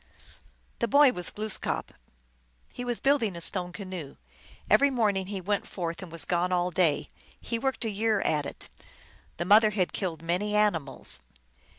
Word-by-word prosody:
The 235 Hz, -, +1 dB
boy 285 Hz, +3 st, +6 dB
was 180 Hz, -6 st, -1 dB
Glooskap. 215 Hz, -1 st, -3 dB, 0.8 s
He 245 Hz, -, -5 dB
was 240 Hz, -1 st, -2 dB
building 255 Hz, -9 st, +2 dB
a -, -, -6 dB
stone 180 Hz, 0 st, -2 dB
canoe. 185 Hz, -7 st, -7 dB, 0.5 s
Every 280 Hz, -, +5 dB
morning 210 Hz, -7 st, +1 dB
he 200 Hz, -1 st, -3 dB
went 200 Hz, +2 st, -1 dB
forth, 170 Hz, -1 st, -4 dB
and 185 Hz, -3 st, -9 dB
was 165 Hz, -2 st, +1 dB
gone 180 Hz, +1 st, 0 dB
all 180 Hz, 0 st, +1 dB
day. 165 Hz, -4 st, +1 dB, 0.3 s
He 230 Hz, -, -3 dB
worked 265 Hz, -1 st, -1 dB
a -, -, 0 dB
year 215 Hz, +1 st, +1 dB
at 150 Hz, -2 st, +1 dB
it. -, -, -9 dB, 0.7 s
The 175 Hz, -, -2 dB
mother 215 Hz, +3 st, +6 dB
had 195 Hz, -4 st, -1 dB
killed 165 Hz, -5 st, -3 dB
many 185 Hz, +5 st, 0 dB
animals. 170 Hz, -10 st, 0 dB
195 Hz, 165 wpm, -28 LUFS, 175-220 Hz, 0.8 s, boy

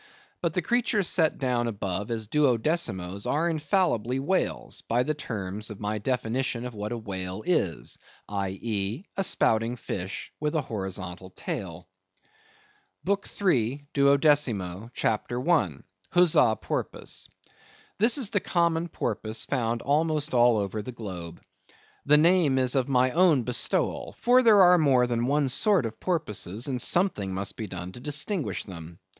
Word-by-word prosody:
But -, -, -1 dB
the -, -, 0 dB
creatures 220 Hz, -6 st, +1 dB
set 160 Hz, -4 st, +2 dB
down 125 Hz, -3 st, 0 dB
above 100 Hz, -2 st, -3 dB
as 115 Hz, -2 st, -2 dB
Duodecimoes 115 Hz, -, 0 dB
are 160 Hz, +4 st, +1 dB
infallibly 150 Hz, -, 0 dB
whales, 185 Hz, +8 st, -1 dB
by 120 Hz, +2 st, +2 dB
the 155 Hz, -, -1 dB
terms 105 Hz, -7 st, -4 dB
of 105 Hz, -2 st, -8 dB
my 105 Hz, 0 st, -2 dB
definition 125 Hz, +1 st, -2 dB
of 125 Hz, -, -6 dB
what 105 Hz, +1 st, -5 dB
a 120 Hz, -, -2 dB
whale 95 Hz, -2 st, -5 dB
is—i.e. 100 Hz, -, -3 dB
a 195 Hz, -, 0 dB
spouting 115 Hz, -8 st, +1 dB
fish, 95 Hz, -4 st, -6 dB
with 150 Hz, +1 st, -1 dB
a 155 Hz, -, +2 dB
horizontal 95 Hz, -5 st, -5 dB
tail. 90 Hz, -2 st, -6 dB, 1.2 s
BOOK 200 Hz, +1 st, -1 dB
III. 140 Hz, -, +1 dB
(Duodecimo), 140 Hz, -, +2 dB
CHAPTER 120 Hz, +1 st, -1 dB
1. 125 Hz, -, +1 dB, 0.3 s
(Huzza 155 Hz, -10 st, +4 dB
Porpoise).—This 230 Hz, +7 st, -3 dB
is 245 Hz, -7 st, -1 dB
the 205 Hz, -, +2 dB
common 170 Hz, -2 st, +1 dB
porpoise 110 Hz, -7 st, -3 dB
found 115 Hz, -3 st, -1 dB
almost 150 Hz, 0 st, 0 dB
all 120 Hz, -2 st, +5 dB
over 105 Hz, +1 st, -2 dB
the 125 Hz, -, -7 dB
globe. 90 Hz, -8 st, -7 dB, 0.7 s
The 150 Hz, +1 st, +7 dB
name 165 Hz, -3 st, +4 dB
is 130 Hz, -1 st, +2 dB
of 135 Hz, -1 st, +1 dB
my 130 Hz, -1 st, +3 dB
own 165 Hz, -6 st, +4 dB
bestowal; 125 Hz, +1 st, -1 dB
for 250 Hz, +1 st, +5 dB
there 215 Hz, -5 st, +7 dB
are 180 Hz, 0 st, +6 dB
more 135 Hz, -5 st, +4 dB
than 120 Hz, 0 st, -1 dB
one 145 Hz, 0 st, +2 dB
sort 170 Hz, -, +2 dB
of 110 Hz, -1 st, -6 dB
porpoises, 115 Hz, -, -3 dB
and 130 Hz, -3 st, -1 dB
something 170 Hz, -, +1 dB
must 95 Hz, +1 st, -3 dB
be 110 Hz, -, -5 dB
done 90 Hz, -1 st, -6 dB
to 110 Hz, -, -11 dB
distinguish 150 Hz, -, -2 dB
them. 85 Hz, -3 st, -10 dB
125 Hz, 145 wpm, -27 LUFS, 105-155 Hz, 1.2 s, The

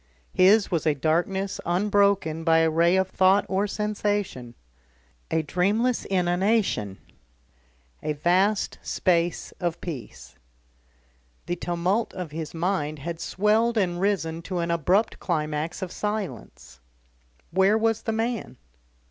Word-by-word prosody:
His 200 Hz, +3 st, +5 dB
was 165 Hz, -3 st, 0 dB
a 150 Hz, -, +3 dB
darkness 175 Hz, +7 st, 0 dB
unbroken 195 Hz, -3 st, +1 dB
by 165 Hz, -1 st, +4 dB
a 165 Hz, 0 st, +3 dB
ray 170 Hz, +3 st, +3 dB
of 190 Hz, 0 st, +2 dB
thought 190 Hz, +2 st, +3 dB
or 195 Hz, +2 st, 0 dB
sensation, 205 Hz, -, -2 dB, 0.7 s
a 160 Hz, -, +1 dB
dreamless 205 Hz, +10 st, 0 dB
inanition, 180 Hz, -, +1 dB, 1.0 s
a 150 Hz, -, -1 dB
vast 185 Hz, +7 st, +1 dB
space 175 Hz, -2 st, 0 dB
of 170 Hz, -1 st, -2 dB
peace. 140 Hz, -, -8 dB, 1.1 s
The 175 Hz, -, -2 dB
tumult 175 Hz, +6 st, -1 dB
of 180 Hz, -4 st, -5 dB
his 160 Hz, 0 st, -5 dB
mind 165 Hz, -3 st, -1 dB
had 165 Hz, +3 st, -6 dB
swelled 220 Hz, +6 st, +1 dB
and 175 Hz, -3 st, 0 dB
risen 170 Hz, -5 st, 0 dB
to 180 Hz, +1 st, -5 dB
an 170 Hz, 0 st, -1 dB
abrupt 180 Hz, +7 st, +1 dB
climax 155 Hz, 0 st, -2 dB
of 180 Hz, -, -5 dB
silence. 205 Hz, -, -5 dB, 0.7 s
Where 190 Hz, +4 st, +4 dB
was 225 Hz, 0 st, +1 dB
the 225 Hz, -, -2 dB
man? 225 Hz, +1 st, -3 dB
180 Hz, 125 wpm, -25 LUFS, 165-205 Hz, 1.1 s, His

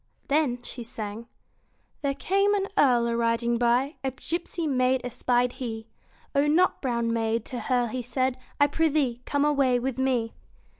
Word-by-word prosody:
Then 275 Hz, -5 st, +1 dB
she 250 Hz, -, -7 dB
sang 220 Hz, 0 st, -6 dB, 0.7 s
There 275 Hz, -1 st, 0 dB
came 395 Hz, +7 st, +2 dB
an 395 Hz, -1 st, -1 dB
earl 250 Hz, -9 st, +4 dB
a 235 Hz, 0 st, 0 dB
riding 235 Hz, 0 st, +1 dB
by, 245 Hz, +5 st, +2 dB
A 265 Hz, -, +1 dB
gipsy 335 Hz, +5 st, -4 dB
maid 255 Hz, -2 st, +2 dB
espied 245 Hz, 0 st, +1 dB
he; 225 Hz, -3 st, -5 dB, 0.5 s
O 280 Hz, 0 st, +3 dB
nut 345 Hz, +5 st, +3 dB
brown 235 Hz, -3 st, 0 dB
maid, 225 Hz, 0 st, 0 dB
to 250 Hz, -, -5 dB
her 245 Hz, +1 st, +1 dB
he 250 Hz, +3 st, -3 dB
said, 255 Hz, +2 st, -1 dB, 0.2 s
I 285 Hz, -, +7 dB
prithee, 290 Hz, -5 st, +1 dB
come 285 Hz, 0 st, +1 dB
away 275 Hz, -4 st, +3 dB
with 255 Hz, +1 st, -3 dB
me. 250 Hz, -4 st, 0 dB
255 Hz, 160 wpm, -26 LUFS, 235-285 Hz, 0.7 s, I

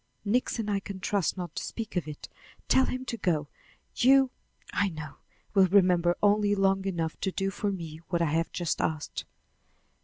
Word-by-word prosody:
"Nixon 225 Hz, 0 st, 0 dB
I 200 Hz, -1 st, +1 dB
can 195 Hz, -1 st, -7 dB
trust 195 Hz, 0 st, 0 dB
not 175 Hz, -3 st, -5 dB
to -, -, -3 dB
speak 225 Hz, -3 st, -6 dB
of 175 Hz, -4 st, -1 dB
it. 150 Hz, -1 st, -8 dB, 0.4 s
Tell 265 Hz, -, +5 dB
him 255 Hz, 0 st, -3 dB
to 235 Hz, -, -4 dB
go. 155 Hz, -8 st, 0 dB, 0.5 s
You, 265 Hz, +1 st, +5 dB, 0.4 s
I 200 Hz, -, +2 dB
know, 155 Hz, -3 st, -8 dB, 0.4 s
will 195 Hz, -2 st, +6 dB
remember 180 Hz, -2 st, +4 dB
only 205 Hz, 0 st, +4 dB
long 195 Hz, 0 st, +2 dB
enough 165 Hz, -4 st, -2 dB
to 190 Hz, -, -1 dB
do 195 Hz, +1 st, -1 dB
for 205 Hz, +1 st, -1 dB
me 165 Hz, -5 st, -6 dB
what 175 Hz, -, +1 dB
I 170 Hz, -, +3 dB
have 165 Hz, +2 st, 0 dB
just 175 Hz, -3 st, -1 dB
asked." 155 Hz, -2 st, -2 dB
195 Hz, 180 wpm, -28 LUFS, 170-205 Hz, 0.5 s, will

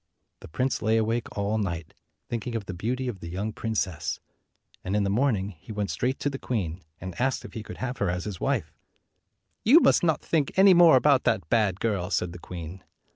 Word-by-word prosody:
The -, -, -11 dB
prince 125 Hz, +11 st, -1 dB
lay 110 Hz, +1 st, +2 dB
awake 115 Hz, +2 st, 0 dB
all 100 Hz, +2 st, 0 dB
night, 85 Hz, -6 st, -3 dB, 0.3 s
thinking 120 Hz, 0 st, -4 dB
of 110 Hz, -3 st, -3 dB
the 95 Hz, -, -5 dB
beauty 125 Hz, +8 st, -2 dB
of 110 Hz, -6 st, -4 dB
the 85 Hz, -, -7 dB
young 100 Hz, +5 st, -3 dB
princess; 95 Hz, -9 st, -2 dB, 0.6 s
and 95 Hz, +2 st, -2 dB
in 105 Hz, -, +2 dB
the 100 Hz, -, 0 dB
morning 105 Hz, -4 st, +1 dB
he 95 Hz, +2 st, -12 dB
went 105 Hz, -2 st, -2 dB
straight 130 Hz, +2 st, -1 dB
to 145 Hz, -, +1 dB
the 135 Hz, -, -5 dB
queen, 95 Hz, -8 st, -3 dB, 0.2 s
and 95 Hz, -1 st, -6 dB
asked 130 Hz, 0 st, 0 dB
if -, -, -10 dB
he 110 Hz, -, -5 dB
could -, -, -9 dB
have 130 Hz, 0 st, -4 dB
her 100 Hz, -, +1 dB
as 90 Hz, +1 st, -2 dB
his 100 Hz, -4 st, -6 dB
wife. -, -, -1 dB, 0.9 s
214 230 Hz, -, +3 dB
"You 325 Hz, -, +11 dB
must -, -, +5 dB
not 160 Hz, -3 st, +2 dB
think 155 Hz, -1 st, 0 dB
any 190 Hz, 0 st, +8 dB
more 170 Hz, -4 st, +7 dB
about 135 Hz, 0 st, +4 dB
that 90 Hz, -5 st, +1 dB
bad 105 Hz, -5 st, +2 dB
girl," 100 Hz, -6 st, -1 dB
said 90 Hz, -3 st, 0 dB
the 90 Hz, -, -9 dB
queen. 85 Hz, +1 st, -8 dB
105 Hz, 220 wpm, -26 LUFS, 95-125 Hz, 0.9 s, You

